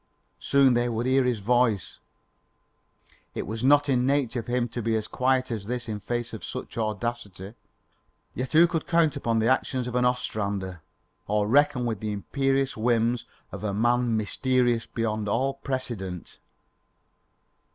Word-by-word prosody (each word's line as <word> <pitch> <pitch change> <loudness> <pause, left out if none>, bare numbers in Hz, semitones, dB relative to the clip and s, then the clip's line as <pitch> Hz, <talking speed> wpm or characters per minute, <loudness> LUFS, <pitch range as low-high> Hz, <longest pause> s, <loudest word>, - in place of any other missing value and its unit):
Soon 140 -2 +4
they 120 0 +1
would 115 +1 -2
hear 130 0 +3
his 125 -2 +1
voice. 115 -1 +1 1.4
It - - -3
was 110 +3 -5
not 145 +2 +5
in 125 -3 +2
nature 130 -3 +1
for 120 - -8
him 125 -1 +1
to 120 +1 -4
be 115 0 0
as 110 -1 -2
quiet 130 0 +1
as 110 -4 -4
this 125 0 -3
in 105 -2 -4
face 120 +3 -3
of 110 -6 -7
such - - -6
audacity. 110 -3 -4 0.8
Yet 130 0 -4
who 165 +2 +7
could 165 -2 -2
count 165 -3 +3
upon 115 -5 0
the 110 +1 +2
actions 130 0 +1
of 125 - -5
an 125 0 +2
Ostrander, 100 -7 -2 0.5
or 105 0 +1
reckon 130 0 +3
with 115 -4 -2
the 105 0 -3
imperious 135 +5 0
whims 115 +1 +1 0.2
of - - -7
a 100 -2 -1
man 120 +1 +2
mysterious 120 +2 +1
beyond 110 -2 -2
all 135 +6 +1
precedent? 120 -10 -5
120 Hz, 160 wpm, -26 LUFS, 110-130 Hz, 1.4 s, who